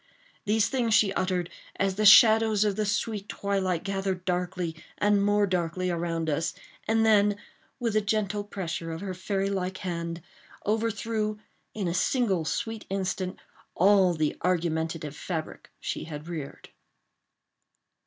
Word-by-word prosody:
These 215 Hz, +1 st, +3 dB
things 235 Hz, -5 st, +1 dB
she 195 Hz, -2 st, +4 dB
uttered 185 Hz, -2 st, -1 dB, 0.2 s
as 195 Hz, 0 st, 0 dB
the 210 Hz, +2 st, +3 dB
shadows 220 Hz, -1 st, +7 dB
of 205 Hz, -2 st, +1 dB
the 215 Hz, 0 st, -1 dB
sweet 210 Hz, -1 st, -2 dB
twilight 190 Hz, -4 st, -1 dB
gathered 195 Hz, -2 st, -2 dB
darkly 180 Hz, -2 st, -2 dB, 0.2 s
and 205 Hz, -1 st, +3 dB
more 205 Hz, 0 st, +3 dB
darkly 180 Hz, -1 st, -1 dB
around 165 Hz, -1 st, -2 dB
us—and 190 Hz, +8 st, -1 dB
then, 205 Hz, -2 st, +4 dB, 0.4 s
with 230 Hz, -3 st, -1 dB
a 215 Hz, -, +4 dB
gentle 210 Hz, -1 st, -1 dB
pressure 170 Hz, -5 st, -5 dB
of 165 Hz, +1 st, -5 dB
her 195 Hz, -2 st, -4 dB
fairy 195 Hz, +1 st, -2 dB
like 185 Hz, -1 st, -2 dB
hand, 170 Hz, -3 st, -4 dB, 0.4 s
overthrew, 220 Hz, 0 st, -1 dB, 0.4 s
in 200 Hz, -4 st, -2 dB
a 170 Hz, -, -1 dB
single 190 Hz, -, +1 dB
sweet 225 Hz, +6 st, -3 dB
instant, 190 Hz, -1 st, -2 dB, 0.4 s
all 190 Hz, -1 st, +5 dB
the 155 Hz, -1 st, 0 dB
argumentative 160 Hz, -3 st, -1 dB
fabric 160 Hz, -2 st, -5 dB
she -, -, -4 dB
had 150 Hz, -1 st, -8 dB
reared. 155 Hz, -5 st, -7 dB
195 Hz, 135 wpm, -27 LUFS, 175-210 Hz, 0.4 s, shadows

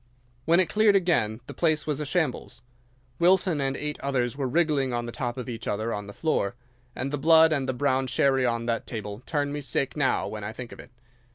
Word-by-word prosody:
When 170 Hz, +2 st, +4 dB
it 185 Hz, -, +3 dB
cleared 210 Hz, +5 st, +4 dB
again 145 Hz, -, +1 dB
the -, -, -9 dB
place 155 Hz, -3 st, +1 dB
was 150 Hz, -1 st, -2 dB
a 150 Hz, -, -3 dB
shambles. 135 Hz, -7 st, -2 dB, 0.6 s
Wilson 180 Hz, -3 st, +3 dB
and 135 Hz, 0 st, -1 dB
eight 150 Hz, 0 st, -4 dB
others 130 Hz, -3 st, -1 dB
were 135 Hz, -2 st, -2 dB
wriggling 140 Hz, -3 st, +1 dB
on 120 Hz, 0 st, -2 dB
the 120 Hz, -, -5 dB
top 120 Hz, 0 st, -4 dB
of 125 Hz, -, -5 dB
each 115 Hz, -2 st, -6 dB
other 110 Hz, +3 st, -1 dB
on 105 Hz, -1 st, -5 dB
the -, -, -8 dB
floor, 110 Hz, -6 st, -1 dB, 0.4 s
and 135 Hz, +3 st, -4 dB
the 145 Hz, -, -1 dB
blood 160 Hz, +1 st, +6 dB
and 135 Hz, -3 st, -1 dB
the -, -, +1 dB
brown 130 Hz, 0 st, 0 dB
sherry 135 Hz, +1 st, +2 dB
on 115 Hz, -1 st, 0 dB
that 115 Hz, -1 st, -2 dB
table 105 Hz, -1 st, -6 dB
turn 145 Hz, -2 st, -1 dB
me 145 Hz, -, -3 dB
sick 135 Hz, -1 st, -1 dB
now 140 Hz, -3 st, +1 dB
when 105 Hz, -1 st, -6 dB
I 105 Hz, +2 st, -5 dB
think 120 Hz, +1 st, -8 dB
of -, -, -11 dB
it. -, -, -12 dB
135 Hz, 225 wpm, -26 LUFS, 120-155 Hz, 0.6 s, blood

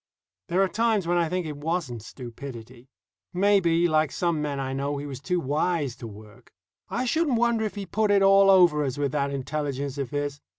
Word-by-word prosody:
There 185 Hz, +3 st, +2 dB
are -, -, +2 dB
times 220 Hz, -2 st, +1 dB
when 175 Hz, +1 st, +1 dB
I 165 Hz, -2 st, +1 dB
think 180 Hz, 0 st, -2 dB
it 150 Hz, -2 st, -6 dB
wasn't 150 Hz, -6 st, -3 dB
stupidity. 120 Hz, +1 st, -10 dB, 0.4 s
Maybe, 180 Hz, -3 st, +3 dB
like 155 Hz, -2 st, +2 dB
some 170 Hz, -3 st, -1 dB
men 145 Hz, -2 st, -3 dB
I 130 Hz, -1 st, -3 dB
know, 140 Hz, +2 st, -2 dB
he 140 Hz, -, -5 dB
was 135 Hz, -3 st, -6 dB
too 180 Hz, +6 st, -1 dB
wise 150 Hz, -2 st, -1 dB
to 115 Hz, -, -8 dB
work. 105 Hz, 0 st, -14 dB, 0.4 s
I 255 Hz, -, -2 dB
shouldn't 290 Hz, -1 st, +1 dB
wonder 235 Hz, -1 st, +1 dB
if 215 Hz, -, -4 dB
he 200 Hz, -1 st, -5 dB
put 215 Hz, +3 st, 0 dB
it 200 Hz, -1 st, +4 dB
all 195 Hz, 0 st, +6 dB
over 175 Hz, -6 st, +5 dB
us 135 Hz, -1 st, -3 dB
with 145 Hz, -1 st, -1 dB
that 140 Hz, -1 st, 0 dB
intelligence 140 Hz, 0 st, -3 dB
of 135 Hz, -, -3 dB
his. 145 Hz, -1 st, -3 dB
150 Hz, 205 wpm, -26 LUFS, 140-185 Hz, 0.4 s, all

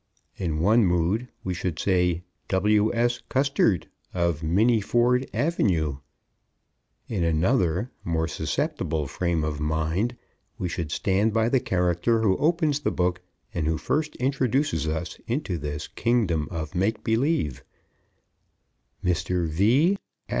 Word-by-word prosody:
In 80 Hz, -5 st, -2 dB
one 110 Hz, +6 st, +5 dB
mood 90 Hz, +6 st, +1 dB, 0.2 s
we 95 Hz, -, -2 dB
should 90 Hz, -2 st, -3 dB
say 90 Hz, -2 st, +1 dB, 0.2 s
W.S. 105 Hz, +5 st, +2 dB
Custard 130 Hz, -, +2 dB, 0.3 s
of 85 Hz, -3 st, 0 dB
Minnieford 120 Hz, +7 st, +2 dB
Ave. 85 Hz, -, 0 dB, 1.1 s
In 100 Hz, -7 st, -1 dB
another, 90 Hz, +5 st, +1 dB
more 80 Hz, -1 st, 0 dB
susceptible 80 Hz, -1 st, -2 dB
frame 85 Hz, +3 st, -1 dB
of 75 Hz, -1 st, -2 dB
mind, 80 Hz, +10 st, 0 dB, 0.4 s
we 90 Hz, -, -2 dB
should 85 Hz, -3 st, -4 dB
stand 100 Hz, +6 st, +1 dB
by 115 Hz, +1 st, +2 dB
the 130 Hz, -, +3 dB
character 90 Hz, +4 st, +1 dB
who 95 Hz, -4 st, +3 dB
opens 155 Hz, -2 st, +2 dB
the -, -, 0 dB
book 90 Hz, 0 st, 0 dB, 0.3 s
and 80 Hz, -2 st, -1 dB
who 80 Hz, 0 st, +1 dB
first 150 Hz, -, -1 dB
introduces 130 Hz, -, 0 dB
us 80 Hz, +2 st, -3 dB
into 115 Hz, -, -2 dB
this 75 Hz, +1 st, -4 dB
Kingdom 105 Hz, -11 st, 0 dB
of 80 Hz, -1 st, -5 dB
Make 100 Hz, +4 st, 0 dB
Believe 115 Hz, -, 0 dB, 1.4 s
_Mr. 90 Hz, 0 st, 0 dB
V. 120 Hz, -, +3 dB
90 Hz, 120 wpm, -25 LUFS, 80-120 Hz, 1.4 s, one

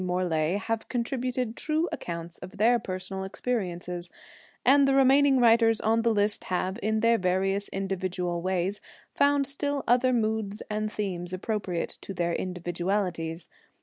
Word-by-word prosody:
Morlae 180 Hz, -1 st, 0 dB
have 225 Hz, +2 st, -3 dB
contributed 250 Hz, -1 st, -2 dB
true 315 Hz, +2 st, 0 dB
accounts 170 Hz, 0 st, -6 dB
of 180 Hz, +1 st, -10 dB
their 235 Hz, +4 st, +4 dB
personal 190 Hz, -1 st, -5 dB
experiences; 180 Hz, -5 st, -3 dB, 0.6 s
and 275 Hz, +1 st, +6 dB
the 270 Hz, -, +3 dB
remaining 270 Hz, 0 st, +5 dB
writers 230 Hz, -1 st, +5 dB
on 225 Hz, +1 st, +2 dB
the 230 Hz, -, +2 dB
list 205 Hz, -1 st, +1 dB
have, 185 Hz, +3 st, -2 dB
in 220 Hz, +1 st, 0 dB
their 230 Hz, +1 st, +4 dB
various 195 Hz, +2 st, 0 dB
individual 185 Hz, -2 st, -2 dB
ways, 185 Hz, +2 st, -1 dB, 0.3 s
found 285 Hz, 0 st, +3 dB
still 280 Hz, 0 st, -2 dB
other 250 Hz, +2 st, +4 dB
moods 220 Hz, -3 st, -1 dB
and 215 Hz, 0 st, -1 dB
themes 180 Hz, -4 st, -4 dB
appropriate 185 Hz, -2 st, -3 dB
to 195 Hz, -, -7 dB
their 170 Hz, -1 st, 0 dB
individualities. 175 Hz, -2 st, -2 dB
205 Hz, 140 wpm, -27 LUFS, 180-235 Hz, 0.6 s, and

